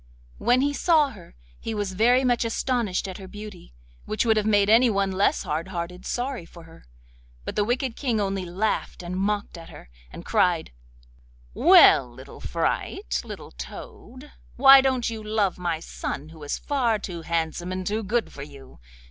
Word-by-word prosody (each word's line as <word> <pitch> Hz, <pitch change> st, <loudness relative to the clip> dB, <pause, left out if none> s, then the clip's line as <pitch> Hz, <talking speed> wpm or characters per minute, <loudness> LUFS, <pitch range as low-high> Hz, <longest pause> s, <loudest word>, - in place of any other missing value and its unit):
When 245 Hz, +1 st, +3 dB
he 285 Hz, +1 st, +1 dB
saw 305 Hz, -2 st, +3 dB
her 185 Hz, -6 st, -15 dB, 0.2 s
he 225 Hz, -, -5 dB
was 205 Hz, -2 st, -3 dB
very 245 Hz, +6 st, +3 dB
much 245 Hz, -2 st, +2 dB
astonished 230 Hz, -4 st, -1 dB
at 190 Hz, 0 st, -7 dB
her 190 Hz, -, -9 dB
beauty, 205 Hz, -, -10 dB, 0.3 s
which 215 Hz, -, -1 dB
would 220 Hz, -1 st, +4 dB
have 215 Hz, 0 st, 0 dB
made 205 Hz, -2 st, +3 dB
anyone 215 Hz, -4 st, +4 dB
less 190 Hz, +2 st, +1 dB
hard 160 Hz, +3 st, -3 dB
hearted 180 Hz, 0 st, -6 dB
sorry 250 Hz, -4 st, -3 dB
for 170 Hz, 0 st, -14 dB
her. 165 Hz, 0 st, -17 dB, 0.6 s
But -, -, -5 dB
the 205 Hz, -, +2 dB
wicked 245 Hz, +2 st, -1 dB
King 240 Hz, -6 st, -1 dB
only 195 Hz, -2 st, -1 dB
laughed 185 Hz, +1 st, -2 dB
and 175 Hz, +1 st, -5 dB
mocked 200 Hz, -1 st, -2 dB
at 165 Hz, -, -12 dB
her, -, -, -14 dB, 0.2 s
and -, -, -10 dB
cried: 175 Hz, -3 st, +1 dB, 0.8 s
'Well, -, -, +6 dB
little -, -, -13 dB
fright, -, -, -2 dB
little -, -, -9 dB
toad! 245 Hz, -, -10 dB, 0.2 s
why 270 Hz, +1 st, +8 dB
don't 260 Hz, -2 st, 0 dB
you 225 Hz, -1 st, -4 dB
love 210 Hz, -4 st, 0 dB
my 170 Hz, -3 st, -2 dB
son, 155 Hz, -2 st, -6 dB
who 160 Hz, -1 st, -14 dB
is 145 Hz, -, -3 dB
far 250 Hz, -6 st, 0 dB
too 180 Hz, -4 st, -7 dB
handsome 165 Hz, +2 st, -2 dB
and 185 Hz, 0 st, -4 dB
too 215 Hz, +3 st, -1 dB
good 225 Hz, +3 st, -1 dB
for 140 Hz, -, -9 dB
you? 140 Hz, -, -12 dB
205 Hz, 175 wpm, -25 LUFS, 175-235 Hz, 0.8 s, why